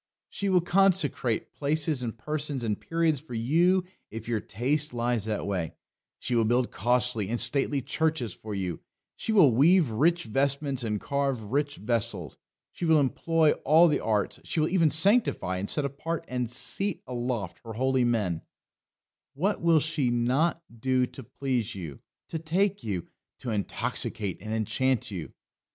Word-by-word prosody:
She 200 - -2
will 185 -2 +4
consecrate 175 - +1
places 150 -1 0
and 115 -2 -4
persons 145 0 -3
and 105 -3 -2
periods 165 -4 0
for 145 -6 -8
you 170 +11 +3 0.3
if 115 0 -8
your 115 -2 0
taste 130 +7 -1
lies 120 -2 0
that 110 -1 -2
way; 90 -5 -3 0.4
she - - -4
will 115 -1 +3
build 120 +3 +1
costly 120 -4 +2
and 120 +1 -1
stately 135 +3 +3
churches 145 - -1
for 105 -1 -7
you; 90 -3 -3 0.4
she - - -3
will 185 - +6
weave 155 +2 +4
rich 170 +9 +2
vestments 140 +1 -1
and 105 -2 -1
carve 140 -3 -1
rich 145 +7 -1
vessels; 115 0 -2 0.3
she - - -9
will 160 -2 +5
employ 155 +3 +2
all 160 +5 +6
the 150 - +1
arts; 105 -2 -1
she - - -2
will 155 - +2
even 170 -4 +3
sanctify 160 - +2
and 100 +2 -3
set 150 - +1
apart 155 +4 -4
and 125 -2 -2
seat 130 - -1
aloft 120 -8 -3
her 115 -1 -7
holy 130 +2 +1
men 105 -9 0 0.9
what 195 +9 0
will 165 -1 +5
she 155 -4 0
not 130 +8 +1 0.2
do 130 +1 +2
to 135 - -11
please 125 -2 -3
you, 80 -8 -7 0.3
to 160 - -3
take 190 +5 0
you, 95 -6 -3 0.3
to 120 - -5
intoxicate 105 -1 -3
and 110 +2 -6
enchant 110 +3 0
you? 90 -5 -6
130 Hz, 160 wpm, -27 LUFS, 115-155 Hz, 0.9 s, will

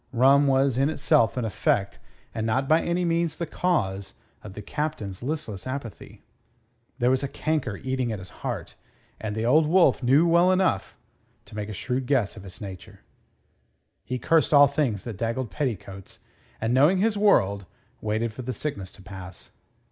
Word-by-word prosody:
Rum 135 +4 +5
was 135 -1 +2
in 135 +2 +3
itself 130 -6 +2
an 125 - -1
effect, 100 -2 0 0.3
and 110 - -3
not 130 +5 0
by 160 +3 +4
any 175 +1 -1
means 170 -1 0
the 170 - -3
cause 100 - -1 0.3
of 105 - -9
the - - -6
Captain's 145 -10 -4
listless 130 -7 -4
apathy. 130 -4 -7 0.7
There 125 -1 +2
was 130 - +2
a 140 - -2
canker 150 -9 -2
eating 130 -1 -2
at 110 - -3
his 95 -1 -10
heart, - - -4 0.5
and 105 -1 -4
the 110 +1 -2
Old 150 +6 +4
Wolf 175 -1 +4
knew 150 +7 +4
enough 185 - +1 0.5
to - - -13
make 105 0 -4
a - - -5
shrewd 125 +5 -3
guess 130 -8 +1
of 100 - -10
its 90 -2 -11
nature. 95 -3 -10 1.0
He 125 - -3
cursed 155 +4 +2
all 145 0 +9
things 140 -8 -1
that 115 -5 -6
daggled 115 +1 -2
petticoats, 95 -6 -5 0.4
and, 115 +2 0
knowing 150 +9 +5
his 215 +3 +1
world, 100 - +2 0.3
waited 110 +1 -1
for 130 - -7
the 130 +1 -4
sickness 100 -12 -4
to 95 - -13
pass. 95 -1 -10
125 Hz, 170 wpm, -25 LUFS, 105-150 Hz, 1.0 s, all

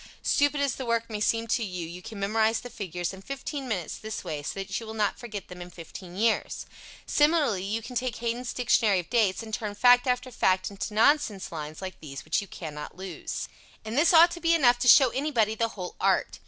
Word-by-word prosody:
Stupid 285 0 +2
as 280 -3 0
the 260 - -4
work 230 0 0
may 210 - -3
seem 225 +2 +1
to 230 - +1
you, 180 -4 -4
you 175 +2 -9
can 210 +2 -9
memorize 220 +3 +1
the 245 - -9
figures 180 -4 -4
in 190 - -10
fifteen 275 +3 -5
minutes 185 -8 -3
this 220 0 -6
way 150 -2 -4
so 145 - -5
that 195 - -3
you 225 - -9
will 220 - -7
not 210 -2 0
forget 215 -5 -7
them 180 0 -10
in 175 - -8
fifteen 175 +1 -10
years. 220 +3 0 0.4
Similarly 295 - +3
you 215 +3 -2
can 250 - -8
take 250 0 -1
Haydn's 240 +2 -3
Dictionary 220 -4 +2
of 175 - -8
Dates 225 -3 +2
and 220 -1 -10
turn 210 -2 -3
fact 245 +4 +5
after 250 +1 0
fact 190 -4 +1
into 200 +2 -5
nonsense 220 -5 +2
lines 155 +1 -6
like 185 -1 -6
these 140 -3 -9
which 155 - +1
you 200 - -9
cannot 150 -3 -8
lose. 190 -3 -5 0.4
And 220 +1 -4
this 315 +6 +5
ought 340 0 +7
to 345 - -6
be 335 0 +4
enough 245 -6 +4
to 245 - 0
show 260 +1 +8
anybody 250 -6 +1
the 230 +1 0
whole 180 -1 -6
art. - - +1
220 Hz, 225 wpm, -27 LUFS, 190-250 Hz, 0.4 s, show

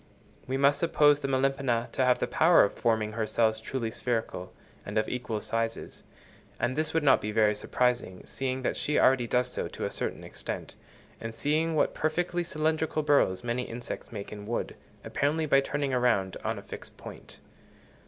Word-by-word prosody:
We 130 +1 -1
must 140 +1 +4
suppose 145 -3 +4
the 140 - -3
Melipona 135 -3 +1
to 130 - 0
have 125 -1 +4
the - - 0
power 165 +2 +5
of 100 - 0
forming 110 -2 0
her 110 0 -2
cells 110 -1 +1
truly 115 -1 -3
spherical, 115 -7 -3 0.3
and - - -4
of 110 - +2
equal 125 -3 -3
sizes; 115 0 -3 0.5
and 120 +2 0
this 155 +1 0
would 165 -1 +1
not 135 -2 +5
be 105 - -3
very 105 -1 +3
surprising, 120 -2 -1
seeing 130 -1 -3
that - - 0
she 150 - -1
already 130 -2 +4
does 125 +1 +1
so - - -3
to - - -5
a - - -3
certain - - -3
extent, - - -6 0.5
and 115 0 -6
seeing 160 +4 +1
what 150 - +2
perfectly 175 +3 -1
cylindrical 155 0 0
burrows 120 -11 +3
many 120 +1 -1
insects 115 +1 -6
make 100 -3 -6
in 105 -1 -8
wood, 120 - -3 0.3
apparently 155 +3 0
by 135 -2 +5
turning 140 0 -2
round 120 -7 +2
on - - -1
a - - -8
fixed - - -10
point. - - -11
125 Hz, 185 wpm, -28 LUFS, 115-145 Hz, 0.5 s, power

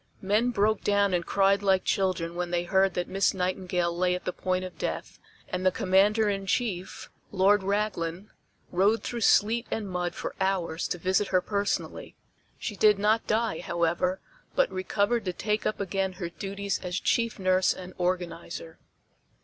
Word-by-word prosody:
Men 210 +5 +2
broke 215 -2 +1
down 200 -1 +2
and 175 -1 +1
cried 195 +2 +2
like 190 -2 +3
children 185 -3 0
when 175 0 -3
they 175 0 0
heard 190 +1 +2
that 175 - -1
Miss 195 +1 +1
Nightingale 180 -2 -1
lay 180 +1 +1
at 180 - -7
the 180 - -2
point 185 0 -1
of 185 - -10
death, - - -4 0.3
and 180 0 -3
the 185 - +4
Commander 200 +4 +3
in 195 -1 -2
Chief, 190 -4 -2 0.2
Lord 200 +1 +4
Raglan, 195 -2 -2 0.4
rode 200 +5 +2
through 240 -1 -4
sleet 225 +3 +3
and 215 -2 -3
mud 180 -1 -3
for - - -5
hours 180 -4 0
to - - -3
visit 190 +4 +1
her 185 - +3
personally. 200 +2 -3 0.4
She 210 - -5
did 210 0 +5
not 215 +3 +2
die, 220 -5 0
however, 170 +2 0 0.4
but - - +3
recovered 200 +4 0
to 180 - -1
take 210 +3 -1
up 215 - -2
again 195 -1 -1
her 180 -2 -5
duties 200 +2 -3
as 180 +1 -3
chief 230 -1 0
nurse 185 -1 +3
and 185 0 -7
organizer. 170 -2 -3
190 Hz, 170 wpm, -27 LUFS, 180-205 Hz, 0.4 s, did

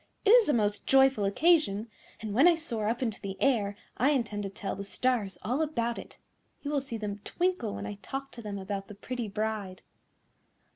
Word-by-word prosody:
It 410 - +6
is 470 -7 +7
a - - +4
most 210 -3 0
joyful 265 -5 +5
occasion, 225 - +3 0.3
and 215 -2 -4
when 270 +10 +6
I 350 - +6
soar 235 -10 -2
up 240 +3 -1
into 225 -4 -3
the 195 -1 -6
air 215 -7 +2 0.2
I 260 +5 +3
intend 230 -7 0
to 195 - -3
tell 195 0 -4
the 200 - -5
stars 210 -1 0
all 250 +10 0
about 235 -7 -1
it. - - -11 0.5
You 285 - -3
will 285 -2 +1
see 250 -4 -5
them 205 -2 -4
twinkle 355 - -1
when - - -5
I 205 -1 -6
talk 270 +5 -5
to 235 - -9
them 205 -2 -5
about 195 0 -4
the 210 - -10
pretty 240 +2 -4
bride." 210 -2 -3
225 Hz, 205 wpm, -29 LUFS, 205-270 Hz, 0.5 s, is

